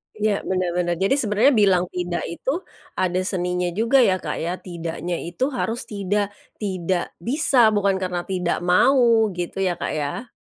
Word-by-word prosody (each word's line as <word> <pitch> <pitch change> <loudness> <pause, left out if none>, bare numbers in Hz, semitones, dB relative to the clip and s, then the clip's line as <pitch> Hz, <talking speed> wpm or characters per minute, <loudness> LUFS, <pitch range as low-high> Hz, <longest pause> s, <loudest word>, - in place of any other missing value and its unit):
Ya, 210 -1 +1
bener 185 -2 0
bener. 175 0 0
Jadi 195 +9 +2
sebenarnya 220 +5 +3
bilang 195 -6 +4
tidak 175 -1 -3
itu 275 - -3 0.3
ada 180 0 0
seninya 180 -2 -1
juga 235 +5 +3
ya, 190 -7 +4
Kak, - - -4
ya. 175 +2 -2
Tidaknya 170 -1 -5
itu 255 +12 -2
harus 240 -1 -2
tidak 205 0 -2 0.2
tidak 185 -3 -2
bisa 255 - +3
bukan 200 -2 +2
karena 180 -2 -2
tidak 180 -2 -1
mau 230 +4 +4
gitu 175 +2 -4
ya, 185 -2 +1
Kak, 175 - -3
ya. 150 - -3
190 Hz, 160 wpm, -22 LUFS, 175-220 Hz, 0.3 s, bilang